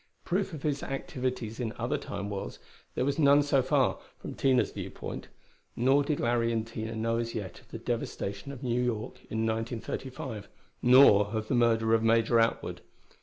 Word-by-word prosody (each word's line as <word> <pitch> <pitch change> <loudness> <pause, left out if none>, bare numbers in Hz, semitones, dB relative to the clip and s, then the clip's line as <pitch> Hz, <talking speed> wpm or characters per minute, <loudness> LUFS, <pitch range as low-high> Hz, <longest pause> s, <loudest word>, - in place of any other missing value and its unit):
Proof 190 +2 0
of 155 -5 -8
his 145 -2 0
activities 130 -6 -4
in 115 -3 -2
other - - -1
Time 100 0 -5
worlds, 100 -1 -5 0.4
there 125 - 0
was 140 +2 0
none 145 -1 +6
so 140 -2 +3
far, 130 0 +2 0.2
from - - -7
Tina's 130 -2 +2
viewpoint. - - -6 0.5
Nor 135 +4 +4
did 145 0 -1
Larry 120 0 +1
and 115 -1 -1
Tina 115 -1 -5
know 115 +1 0
as 115 0 -3
yet 100 -5 -5
of - - -25
the - - -6
devastation 100 +6 -4
of 135 -2 -9
New 125 -1 0
York 115 -3 -2
in 110 +1 -1
1935; 115 +1 -4 0.3
nor 125 -5 +7
of 110 +1 -4
the - - +1
murder 115 -2 +3
of 115 - +4
Major 115 +1 +3
Atwood. 115 0 0
120 Hz, 175 wpm, -29 LUFS, 110-135 Hz, 0.5 s, nor